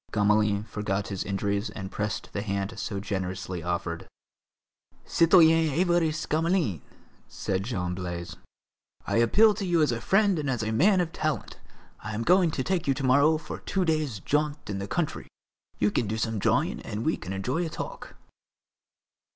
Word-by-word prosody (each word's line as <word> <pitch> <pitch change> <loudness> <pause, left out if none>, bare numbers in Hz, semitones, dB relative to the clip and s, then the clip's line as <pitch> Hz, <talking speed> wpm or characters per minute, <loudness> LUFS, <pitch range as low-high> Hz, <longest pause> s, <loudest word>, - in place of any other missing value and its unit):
Gamelin 105 -1 +2
forgot 105 -2 -3
his 95 -2 -3
injuries 100 +1 -1
and 95 -2 -7
pressed 105 -2 -4
the 100 - -2
hand 100 -1 -2
so 100 -1 -3
generously 95 -2 -4
offered. 85 -1 -3 1.0
"Citoyen 165 -2 +5
Évariste 170 0 +1
Gamelin," 160 - +1 0.5
said 95 -1 -2
Jean 90 -7 -2
Blaise, 85 -2 -5 0.7
"I - - 0
appeal 210 - +5
to 205 0 -5
you 175 -3 +2
as 145 - +2
a 120 0 -3
friend 195 -3 +3
and 145 -2 -2
as 125 -4 -1
a 110 - -1
man 185 - +4
of 170 -2 -3
talent. 155 -1 -3 0.4
I 110 - -6
am 115 - -2
going 180 +4 +4
to 140 -4 -2
take 180 -3 -1
you 135 - +3
to 135 - -4
morrow 140 +5 +4
for 155 - -7
two 190 -2 -1
days' 155 - 0
jaunt 150 -2 -1
in 100 - -3
the 100 - -4
country; 170 +4 -2 0.5
you 105 - +2
can 115 - 0
do 110 +2 -2
some 110 -1 -1
drawing - - +1
and 105 +2 -5
we 160 - +2
can 90 - -8
enjoy 125 - -1
a 165 - -3
talk." - - -7
115 Hz, 175 wpm, -27 LUFS, 100-160 Hz, 1.0 s, Citoyen